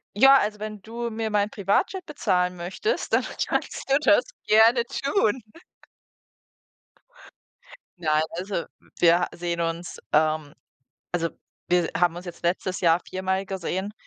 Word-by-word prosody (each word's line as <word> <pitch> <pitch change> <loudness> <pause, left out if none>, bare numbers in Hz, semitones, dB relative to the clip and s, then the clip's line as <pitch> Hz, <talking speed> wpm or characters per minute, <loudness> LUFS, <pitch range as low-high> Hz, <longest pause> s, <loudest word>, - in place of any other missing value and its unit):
Ja, 270 +4 +7
also, 210 0 -2
wenn 215 -2 -6
du 235 +2 -5
mir 220 0 -3
mein 205 0 +1
Privatjet 215 - 0
bezahlen 180 - 0
möchtest, 185 - -3
dann - - +4 0.2
kannst - - -3
du 275 - +5
das 245 -1 +4 0.2
gerne 225 +3 +5
tun. 265 - 0 2.6
Nein, 155 -2 +2 0.2
also, 185 -2 -3 0.3
wir 175 +1 +4
sehen 170 -1 -3
uns, 165 +1 -3 0.2
ähm 155 -1 +2 0.6
also, 165 -1 0 0.4
wir 175 -1 +2
haben 175 -1 +2
uns 180 - -7
jetzt 175 - -9
letztes 185 +1 -1
Jahr 170 0 +4
viermal 190 +1 -1
gesehen, 190 +2 -3
190 Hz, 130 wpm, -25 LUFS, 175-220 Hz, 2.6 s, Ja